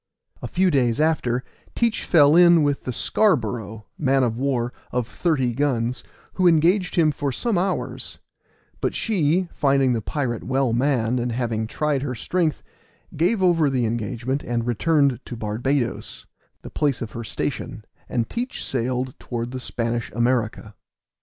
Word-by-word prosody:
A -, -, -4 dB
few 185 Hz, 0 st, +2 dB
days 125 Hz, -4 st, +2 dB
after 135 Hz, -6 st, +1 dB, 0.3 s
Teach 235 Hz, -2 st, 0 dB
fell 150 Hz, -2 st, +5 dB
in 170 Hz, -2 st, +7 dB
with 145 Hz, -1 st, 0 dB
the 125 Hz, -, -2 dB
Scarborough, 115 Hz, -, 0 dB
man 135 Hz, -2 st, +3 dB
of 115 Hz, -2 st, 0 dB
war, 125 Hz, -2 st, -1 dB, 0.2 s
of 125 Hz, -2 st, -1 dB
thirty 135 Hz, -8 st, 0 dB
guns, 125 Hz, -2 st, -1 dB, 0.3 s
who 185 Hz, -1 st, +3 dB
engaged 175 Hz, +4 st, +3 dB
him 160 Hz, -3 st, +4 dB
for 145 Hz, -1 st, -2 dB
some 225 Hz, -, -1 dB
hours; 185 Hz, +2 st, -2 dB, 0.6 s
but -, -, -1 dB
she, 180 Hz, -4 st, +1 dB
finding 135 Hz, -2 st, +2 dB
the 115 Hz, -, -1 dB
pirate 120 Hz, -2 st, -3 dB
well 130 Hz, -2 st, 0 dB
manned, 125 Hz, -2 st, +1 dB
and 120 Hz, 0 st, -1 dB
having 115 Hz, -2 st, -1 dB
tried 150 Hz, +2 st, -1 dB
her 130 Hz, -2 st, -3 dB
strength, 165 Hz, +5 st, -1 dB, 0.5 s
gave 190 Hz, +6 st, +1 dB
over 165 Hz, -5 st, +4 dB
the 130 Hz, -3 st, 0 dB
engagement 115 Hz, +4 st, -2 dB
and 120 Hz, -1 st, -2 dB
returned 140 Hz, +1 st, +2 dB
to 120 Hz, -, -7 dB
Barbadoes, 120 Hz, +4 st, -2 dB, 0.4 s
the -, -, -9 dB
place 140 Hz, -5 st, 0 dB
of 110 Hz, -, -7 dB
her 115 Hz, -, -6 dB
station, 110 Hz, -1 st, -4 dB, 0.2 s
and 115 Hz, -2 st, -1 dB
Teach 245 Hz, +2 st, -4 dB
sailed 130 Hz, 0 st, -2 dB
towards 120 Hz, 0 st, -4 dB
the 130 Hz, -, -5 dB
Spanish 115 Hz, -2 st, -2 dB
America. 120 Hz, -2 st, 0 dB
130 Hz, 155 wpm, -23 LUFS, 120-155 Hz, 0.6 s, in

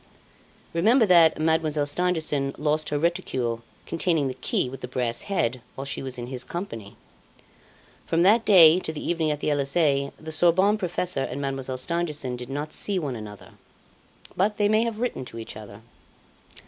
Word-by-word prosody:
Remember 220 Hz, +9 st, +4 dB
that 170 Hz, -4 st, +5 dB
Mademoiselle 155 Hz, -2 st, +1 dB
Stangerson 150 Hz, -4 st, -1 dB
lost 155 Hz, +1 st, 0 dB
her 145 Hz, -, 0 dB
reticule 140 Hz, -8 st, -1 dB, 0.2 s
containing 165 Hz, -3 st, 0 dB
the -, -, -4 dB
key 130 Hz, 0 st, -1 dB
with 135 Hz, +1 st, -8 dB
the 125 Hz, -, -5 dB
brass 125 Hz, -2 st, -2 dB
head 130 Hz, -10 st, 0 dB
while 135 Hz, -, -6 dB
she 140 Hz, -, -4 dB
was 130 Hz, -2 st, -6 dB
in 120 Hz, -, -5 dB
his 125 Hz, 0 st, -4 dB
company. 120 Hz, -, -7 dB, 1.1 s
From 165 Hz, +1 st, +2 dB
that 220 Hz, +5 st, +5 dB
day 175 Hz, -5 st, +7 dB
to 160 Hz, -, -4 dB
the 155 Hz, -, -6 dB
evening 165 Hz, -2 st, 0 dB
at 150 Hz, -1 st, -2 dB
the -, -, 0 dB
Elysee, 140 Hz, -1 st, +1 dB
the 160 Hz, 0 st, -8 dB
Sorbonne 175 Hz, +6 st, +3 dB
professor 180 Hz, -4 st, -2 dB
and 135 Hz, 0 st, -4 dB
Mademoiselle 135 Hz, -2 st, -3 dB
Stangerson 150 Hz, -3 st, -2 dB
did 125 Hz, +1 st, -8 dB
not 145 Hz, +3 st, -4 dB
see 200 Hz, -2 st, -1 dB
one 145 Hz, -8 st, -2 dB
another; 105 Hz, -2 st, -10 dB, 0.8 s
but 205 Hz, +3 st, +1 dB
they 205 Hz, -, +3 dB
may 215 Hz, +2 st, +3 dB
have 225 Hz, -2 st, -3 dB
written 245 Hz, -, -2 dB
to 115 Hz, -, -10 dB
each 115 Hz, -, -8 dB
other. 105 Hz, 0 st, -11 dB
150 Hz, 175 wpm, -25 LUFS, 130-175 Hz, 1.1 s, day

